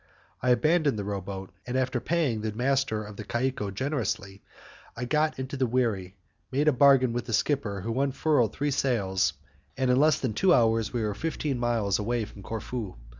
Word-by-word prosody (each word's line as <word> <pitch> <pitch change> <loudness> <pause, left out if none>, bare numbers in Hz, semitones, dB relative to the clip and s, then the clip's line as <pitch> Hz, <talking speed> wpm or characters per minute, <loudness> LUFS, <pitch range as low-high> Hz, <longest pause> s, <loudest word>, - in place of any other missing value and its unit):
I 125 - +1
abandoned 150 +1 +3
the 100 - -3
row 100 -1 -3
boat, 95 0 -7 0.2
and, 125 +1 -1
after 125 -1 0
paying 140 -8 0
the 110 0 -2
master 125 -2 0
of 105 -1 -10
the - - -5
caicco 120 -1 -1
generously, 100 -5 -3 0.6
I 125 - -3
got 155 +4 +1
into 130 +1 -4
the 130 -1 +1
wherry, 110 -7 -1 0.4
made 145 +3 +1
a - - +7
bargain 130 -2 +5
with 120 - -2
the 115 - -3
skipper 105 -4 0
who 115 +6 -1
unfurled 140 -4 +2
three 145 +4 -1
sails, 95 - +1 0.4
and 130 -1 +2
in 125 - +3
less 155 -1 +4
than 125 -5 -2
two 180 - +4
hours 115 -2 +2
we 120 -2 -1
were 105 -1 -1
fifteen 145 0 -2
miles 115 -5 +1
away 115 +1 -1
from 100 - -13
Corfu. 110 0 -5
120 Hz, 190 wpm, -27 LUFS, 105-135 Hz, 0.6 s, a